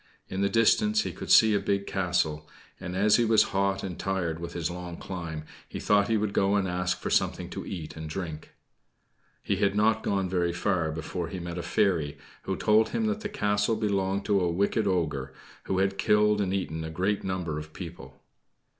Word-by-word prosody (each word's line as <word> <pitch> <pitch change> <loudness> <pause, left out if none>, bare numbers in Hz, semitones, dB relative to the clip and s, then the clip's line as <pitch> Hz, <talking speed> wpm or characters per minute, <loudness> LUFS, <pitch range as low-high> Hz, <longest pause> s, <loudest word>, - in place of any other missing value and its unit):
In 95 - -3
the 100 - +2
distance 210 - +3
he - - -3
could - - -8
see 110 -1 +7
a 100 - +3
big 100 0 -1
castle; 85 -5 -1 0.3
and, 90 - -5
as 105 +2 +4
he 120 - +3
was 110 -1 +5
hot 100 0 +1
and 90 -3 -5
tired 90 -4 -1
with 85 0 -6
his 85 0 -2
long 90 -1 -7
climb, 85 -4 -6 0.3
he - - -6
thought 100 -1 +3
he 115 - +2
would 105 -1 -1
go 100 +1 +2
and 100 -2 +1
ask 90 0 -1
for - - -4
something - - 0
to - - -6
eat 85 -5 -6
and 80 -1 -6
drink. 80 -3 -6 0.9
He 100 - 0
had 100 0 +1
not 110 +1 +3
gone 95 -2 0
very 90 -2 0
far 85 -3 0
before 80 +2 -4
he 90 +3 -6
met 85 0 -5
a - - -2
fairy, 80 -8 +1 0.3
who - - -1
told 110 +1 +3
him 225 - -1
that 215 0 0
the 210 - -4
castle 105 - +1
belonged 100 -2 0
to 100 -2 +3
a 90 - +1
wicked 100 +4 +1
ogre, 75 -8 -1 0.3
who 95 - -1
had 95 0 +1
killed 105 0 +3
and 95 -2 0
eaten 80 -5 -2
a 80 - -4
great 95 +6 -1
number 90 -5 -2
of 75 0 -9
people. 75 -7 -10
95 Hz, 205 wpm, -28 LUFS, 85-105 Hz, 0.9 s, see